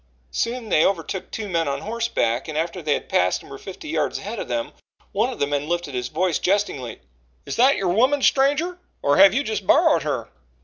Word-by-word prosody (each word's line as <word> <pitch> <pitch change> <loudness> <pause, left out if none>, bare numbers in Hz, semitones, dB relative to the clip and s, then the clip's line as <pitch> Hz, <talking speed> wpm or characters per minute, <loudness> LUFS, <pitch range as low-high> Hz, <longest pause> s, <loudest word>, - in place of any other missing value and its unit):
Soon 235 - -2
they 155 - +4
overtook 190 0 -1
two 215 -2 -5
men 165 -4 0
on 140 - -2
horseback, 220 - -1
and 155 -1 -4
after 165 +3 -2
they 150 -2 +1
passed 90 0 0
and - - -15
were 135 - -8
fifty 195 +10 -9
yards 310 - -1
ahead - - -6
of - - -5
them, 295 0 -2 0.4
one 225 +6 +1
of 245 - -7
the - - +1
men 145 +1 -2
lifted 175 -5 -2
his 125 -1 -2
voice 180 +5 0
jestingly: 180 - -1 0.4
"Is - - -4
that 260 +4 +5
your 190 - 0
woman, 255 +9 +2
stranger, 295 +7 +2 0.2
or 145 - +3
have 195 +1 +8
you 280 - +2
just 215 -6 -3
borrowed - - +5
her?" - - -3
190 Hz, 210 wpm, -23 LUFS, 150-240 Hz, 0.4 s, have